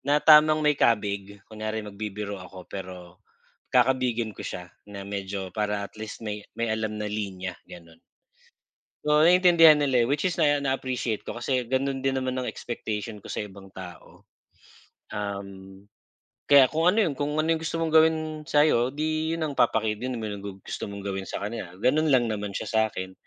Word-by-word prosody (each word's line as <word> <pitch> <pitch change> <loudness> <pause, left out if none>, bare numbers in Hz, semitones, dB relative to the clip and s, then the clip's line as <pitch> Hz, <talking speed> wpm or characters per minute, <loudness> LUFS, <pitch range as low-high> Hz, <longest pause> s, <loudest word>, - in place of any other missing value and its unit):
na 145 +2 +1
tamang 155 0 +7
may 150 -1 +3
kabig. 100 -2 0
Kunyari 110 0 -5
magbibiro 105 0 -5
ako 90 0 -11
perom 90 -2 -9 0.5
kakabigin 125 -3 +2
ko - - -13
siya 90 -1 -7 0.2
na 100 -1 -8
medyo, 100 -1 -5
para 105 0 -1
atleast 110 +2 -9
may 105 -1 -4 0.2
may 115 -1 -1
alam 110 -1 -2
na 105 - -4
linya 100 -3 -4 0.2
gano'n. 85 -1 -13 1.1
Oo, 150 0 +4
naiintindihan 170 -2 +7
nila, 130 -5 +2
eh, - - -3
which 145 +4 0
is 175 -2 0
naa 145 -1 +4
na-appreciate 130 -5 -2
ko 120 - -7
kasi 125 +1 0
gano'n 135 0 0
din 135 0 0
naman 130 -1 -1
ang 130 -1 -2
expectation 110 -3 -5
ko - - -12
sa 105 - -3
ibang 95 -1 -13
tao. 90 -3 -12 0.8
Um, 100 -1 -7 0.7
kaya 140 -2 +8
kung 160 +6 +2
ano 210 +3 +3
yung 155 - -1
kung 145 +2 -2
ano 155 - +2
yung 160 - -3
gusto 165 - -3
mong 165 -1 -1
gawin 160 0 +6 0.3
sa'yo, 145 -5 +4
'di 155 +3 -1
'yon 160 - -1
ang 145 - -3
papaki 110 -4 +2
din 125 +3 -4
mo 110 - -4
na 100 -2 -5
gu 100 -1 -7
gusto - - -7
mong 100 0 -8
gawin 95 -1 -4
sa - - -3
kaniya, 105 -5 -6
gano'n 150 +9 +2
lang 130 -3 +4
naman 105 -2 -3
siya 100 - -4
sa'kin. 110 -4 -1
110 Hz, 180 wpm, -26 LUFS, 100-145 Hz, 1.1 s, kaya